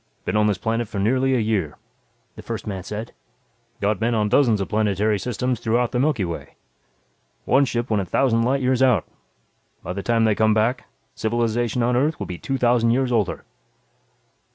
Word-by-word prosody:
"Been - - -1
on 105 0 +3
this 105 -3 +1
planet 115 +4 -2
for 105 - -7
nearly 130 +6 +2
a - - +2
year," 105 -9 -1 0.6
the - - -9
first - - -6
man 95 -3 -4
said. 105 +5 -6 0.7
"Got 105 +1 0
men 115 +1 +1
on 105 -1 +1
dozens 115 -4 +3
of 95 - -2
planetary 105 0 +1
systems 125 +3 -2
throughout 120 +1 0
the 125 - -1
Milky 130 -8 +1
Way. 85 -1 -7 0.9
One 140 +1 +4
ship 120 -2 -3
went 105 -2 +2
a - - -4
thousand 115 +4 +2
light 130 +3 +1
years 130 0 +1
out. 125 -9 +3 0.8
By 90 - -4
the 100 - -4
time 115 +2 +1
they 110 -1 +3
come 110 +1 +2
back, 115 +4 0 0.3
civilization 120 +1 -1
on 120 +1 +1
Earth 145 +6 +1
will - - -5
be 90 - -7
two 135 - -2
thousand 120 -2 +2
years 125 +2 +1
older." 110 -6 -1
115 Hz, 190 wpm, -22 LUFS, 105-125 Hz, 0.9 s, One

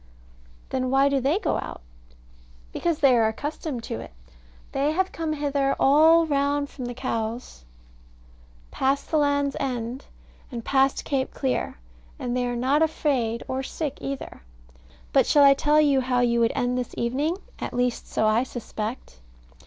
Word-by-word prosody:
Then 255 -1 -1
why 270 +2 +4
do 280 -1 +1
they 280 +8 +2
go - - 0
out? - - -7 0.9
Because 340 -3 -1
they 275 -5 +5
are 225 -2 +4
accustomed 280 +2 -4
to 110 - -5
it. 115 - -9 0.6
They 285 +3 0
have 375 +3 0
come 320 -1 -3
hither 280 -2 0
all 320 +4 +6
round 285 -1 0
from 245 -3 -6
Cowes, 230 - -4 1.1
past 275 +1 0
the 310 - +3
Land's 285 -1 +1
End, 250 -1 -3 0.5
and 235 -2 -6
past 270 0 +2
Cape 270 -2 -1
Clear, 260 - -1 0.4
and 245 -1 -3
they 250 -1 0
are 245 - -2
not 265 +5 +2
afraid 265 -7 0
or 260 0 -2
sick 285 +1 -4
either. 275 0 -6 0.7
But - - +4
shall 290 - +5
I 275 0 +8
tell 295 +2 +3
you 285 -3 +4
how 250 -1 +1
you 235 -1 +2
would 230 -1 +2
end 250 0 0
this 250 - -5
evening? 280 +9 0 0.2
at - - -4
least 245 -1 -1
so 220 - 0
I 215 +2 +3
suspect. 225 - -6
270 Hz, 160 wpm, -25 LUFS, 245-290 Hz, 1.1 s, I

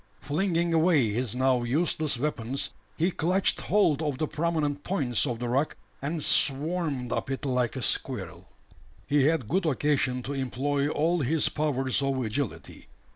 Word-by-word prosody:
Flinging 170 +2 0
away 160 -7 +4
his 120 +1 -2
now 130 -1 +2
useless 150 +2 0
weapons, 130 -1 -2 0.3
he 170 +4 +2
clutched 180 +4 +1
hold 170 -7 +2
of 145 -4 -1
the 155 - -1
prominent 150 -3 -1
points 140 - 0
of 120 -3 -2
the 120 +1 -4
rock, 135 +5 0 0.2
and 150 +2 -2
"swarmed" 145 -3 +1
up - - -2
it 135 +1 -3
like 125 -2 0
a 130 - -4
squirrel. - - -2 0.6
He 145 -2 +3
had 155 -6 +1
good 180 - 0
occasion 135 -3 +1
to 140 - -4
employ 140 +2 -1
all 165 +3 +1
his 150 +3 +1
powers 135 -4 0
of 135 -1 0
agility. 115 +2 -4
145 Hz, 155 wpm, -27 LUFS, 130-160 Hz, 0.6 s, away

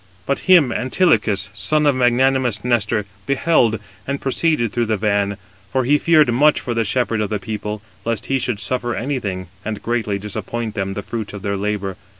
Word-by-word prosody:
But 140 +6 -2
him 165 -9 +7
Antilochus, 120 - +1
son 150 +10 +1
of 145 - +5
magnanimous 125 -2 +2
Nestor, 110 -4 +1 0.2
beheld, 135 -6 +2 0.3
and 140 0 -2
proceeded 135 -4 0
through 120 -1 0
the 110 -1 +1
van, 100 -1 0 0.3
for 130 +2 +1
he 145 +4 +3
feared 155 -7 +4
much 150 +5 +4
for 120 - -3
the 115 -1 +1
shepherd 115 0 0
of 105 - -1
the 105 - -1
people, 105 +1 -5 0.2
lest 115 0 -2
he 135 0 0
should 120 -5 -2
suffer 120 0 -1
anything, 110 -9 -3 0.2
and 110 -1 -5
greatly 115 -4 -1
disappoint 110 +2 -4
them 95 -2 -2
of 95 - -5
[the 100 - -4
fruits 110 -3 -5
of] 100 -1 -8
their 100 -1 -1
labour. 100 -1 -2
115 Hz, 185 wpm, -20 LUFS, 105-130 Hz, 0.3 s, him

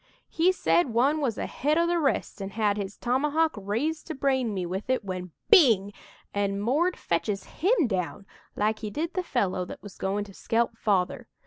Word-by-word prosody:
"He 335 +3 +3
said 170 - +2
one 280 +6 +3
was 240 -7 -1
ahead 300 +4 0
o' 335 - +4
the 345 0 +1
rest 275 -8 -1
an' 195 - -4
had 205 0 +1
his 200 -1 -5
tomahawk 300 +6 +1
raised 225 +11 -2
to 320 - -4
brain 265 -4 +1
me 185 -3 -2
with 190 +7 -5
it 255 -5 +1
when 185 -1 -4 0.2
bing! 225 - +6 0.4
an' 200 -1 0
'Mord' 295 - +1
fetches 195 +4 -1
him 370 - +1
down 195 -2 -3 0.3
like 215 +1 0
he 215 - -4
did 315 +10 -3
the 370 - 0
fellow 195 - -1
that - - -10
was 205 - -11
goin' 200 +2 -1
to 200 -1 -12
skelp 230 +3 0
Father. 195 -5 0
225 Hz, 190 wpm, -27 LUFS, 200-300 Hz, 0.4 s, bing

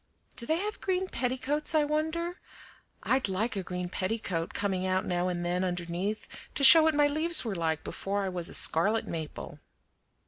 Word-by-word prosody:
Do 235 - -7
they 320 - +1
have 420 +4 -5
green 375 0 -1
petticoats, 265 +5 -2
I 305 - +4
wonder? 320 +4 -3 0.6
I'd 260 -5 0
like 210 +5 -2
a 195 - -2
green 180 0 -5
petticoat 185 -3 -4
coming 195 -2 -3
out 185 +2 -1
now 180 -2 -1
and 175 -1 -3
then 180 +1 -1
underneath 180 +3 -4 0.3
to 275 - -1
show 325 +4 +11
what 315 -1 +2
my 295 0 +3
leaves 310 +1 +2
were 220 - -3
like 160 -3 -2
before 200 +1 -4
I 190 - -2
was 175 -2 -3
a - - -1
scarlet 210 +8 +3
maple." 160 -2 -7
205 Hz, 180 wpm, -28 LUFS, 180-295 Hz, 0.6 s, show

